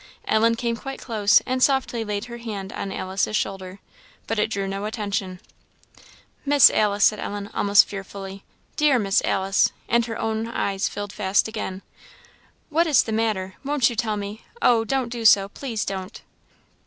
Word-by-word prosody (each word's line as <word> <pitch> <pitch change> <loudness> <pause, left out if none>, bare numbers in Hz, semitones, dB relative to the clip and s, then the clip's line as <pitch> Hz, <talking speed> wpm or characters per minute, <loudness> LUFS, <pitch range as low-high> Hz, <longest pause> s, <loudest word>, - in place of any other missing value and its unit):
Ellen 230 +1 +3
came 235 0 -2
quite 270 +3 -7
close, 210 -4 +3
and 255 0 -2
softly 265 -4 +2
laid 210 0 -3
her 235 -1 -8
hand 205 -4 -6
on 195 - -5
Alice's 190 +3 -2
shoulder. 190 -2 -3 0.5
But 225 0 -2
it 210 - +1
drew 200 -3 -2
no 195 +1 -4
attention. 200 -4 -3 1.0
"Miss 285 -1 +7
Alice," 205 -1 +1
said 215 - +4
Ellen, 205 0 -5
almost 200 0 +5
fearfully, 195 0 -8 0.3
"dear 300 -3 +3
Miss 195 -4 +2
Alice" 195 +1 +2 0.2
and 235 0 +2
her 225 - -5
own 220 0 -2
eyes 200 -3 -1
filled 205 0 -6
fast 200 0 +1
again 205 -3 -5 0.9
"what 330 +3 +2
is 295 -5 +4
the 225 - -5
matter? 215 -4 -1
won't 275 -3 +2
you - - -6
tell 220 -1 -1
me? 205 +2 -6 0.2
Oh! 230 - +4
don't 260 +1 -1
do 235 -1 -5
so! 200 -3 +6
please 230 -2 -4
don't!" 190 -1 -6
215 Hz, 165 wpm, -23 LUFS, 195-235 Hz, 1.0 s, Miss